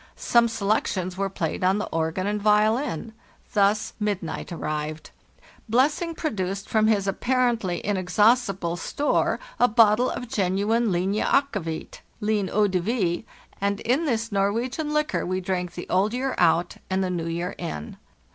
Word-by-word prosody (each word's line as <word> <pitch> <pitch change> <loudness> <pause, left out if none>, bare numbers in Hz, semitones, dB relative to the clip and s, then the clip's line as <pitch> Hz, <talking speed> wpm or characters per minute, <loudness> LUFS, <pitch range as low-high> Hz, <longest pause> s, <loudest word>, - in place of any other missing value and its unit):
Some 235 -1 +3
selections 200 -4 -1
were 195 +1 -1
played 170 -2 -3
on 190 +2 +3
the 210 - -2
organ 165 +3 -1
and 205 0 -1
violin. 215 - +2 0.4
Thus 205 +1 +2
midnight 205 -7 -3
arrived. 155 -1 -4 0.6
Blessing 295 +8 +2
produced 195 - -3
from 215 -1 +2
his 205 -3 +2
apparent 240 +3 +1
ly 175 -2 -2
inexhaustible 195 -1 +2
store 285 - 0 0.2
a 245 - +6
bottle 225 +1 +4
of 245 - -5
genuine 205 +3 +1
'linje 190 +4 0
akkevit 205 - -1
' - - -37
(line 210 -3 0
eau 210 0 +3
de 185 -2 0
vie), 185 -3 -1 0.4
and 200 0 0
in 265 +8 +1
this 230 -4 -1
Norwegian 230 +10 0
liquor 300 0 0
we 185 +1 -1
drank 180 -1 -2
the 175 - -6
old 200 +5 +1
year 265 +1 -1
out 175 0 +2
and 190 0 +1
the 185 - -1
new 170 -2 -2
year 170 +3 -3
in. 160 - -6
200 Hz, 155 wpm, -25 LUFS, 180-230 Hz, 0.6 s, a